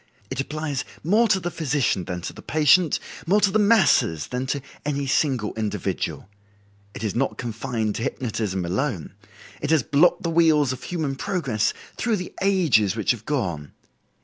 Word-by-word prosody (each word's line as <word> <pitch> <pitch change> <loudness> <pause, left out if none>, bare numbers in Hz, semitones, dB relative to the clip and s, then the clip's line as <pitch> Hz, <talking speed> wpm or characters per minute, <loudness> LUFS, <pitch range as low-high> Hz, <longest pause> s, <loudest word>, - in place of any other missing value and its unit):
It 130 - -4
applies 150 -1 -3 0.2
more 215 +9 +4
to 190 - +3
the 175 -1 -4
physician 140 - 0
than 90 -1 -4
to - - -5
the - - -11
patient, 155 +2 +3 0.3
more 200 +4 +4
to 205 -2 +3
the 215 - +2
masses 200 - +3
than 125 +1 -3
to 140 - -1 0.2
any 140 -1 -1
single 130 -5 +1
individual. 110 -3 -3 0.7
It - - -6
is 105 - -1
not 135 +3 -1
confined 115 -2 -2
to - - -4
hypnotism 105 -7 -2
alone; 95 - -2 0.5
it 145 - -2
has 160 -5 +4
blocked 170 +9 +3
the 170 - -1
wheels 155 -5 +4
of 130 - -9
human 160 -6 -2
progress 135 - 0 0.3
through 235 -2 +1
the 180 -3 -6
ages 165 - +3
which 110 -3 +1
have 115 -3 -5
gone. 85 - -2
140 Hz, 170 wpm, -24 LUFS, 110-165 Hz, 0.7 s, more